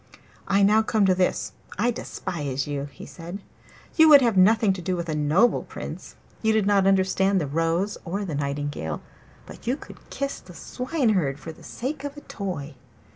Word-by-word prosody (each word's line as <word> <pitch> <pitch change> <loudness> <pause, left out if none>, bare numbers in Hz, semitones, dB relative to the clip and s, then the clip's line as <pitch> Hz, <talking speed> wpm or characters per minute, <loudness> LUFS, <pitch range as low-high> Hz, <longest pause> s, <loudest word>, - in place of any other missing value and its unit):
'I 195 +1 +3
now 210 +2 +5
come 220 -2 +2
to 190 - +5
this. 180 0 0 0.3
I 235 +5 +2
despise 145 - -4
you!' 145 -1 -3
he - - -11
said. 170 +2 -8 0.6
'You 320 -1 +7
would 290 -2 +10
have 230 -4 +2
nothing 210 +2 +5
to 185 - -6
do 185 +1 -1
with 170 -1 -4
a - - 0
noble 155 +10 +3
Prince; - - -8 0.3
you 220 -1 +3
did 215 -2 +2
not 200 -1 +3
understand 190 0 +3
the 155 - -1
rose 165 +7 0
or 195 +4 -3
the 170 - -4
nightingale, 140 - -3 0.4
but - - -13
you 255 +3 +1
could - - -12
kiss 275 0 -3
the 180 - -14
Swineherd 220 - 0
for 165 - -7
the 160 - -16
sake 270 +3 -5
of 285 0 -6
a - - -8
toy. 175 - -5
190 Hz, 185 wpm, -25 LUFS, 160-220 Hz, 0.6 s, would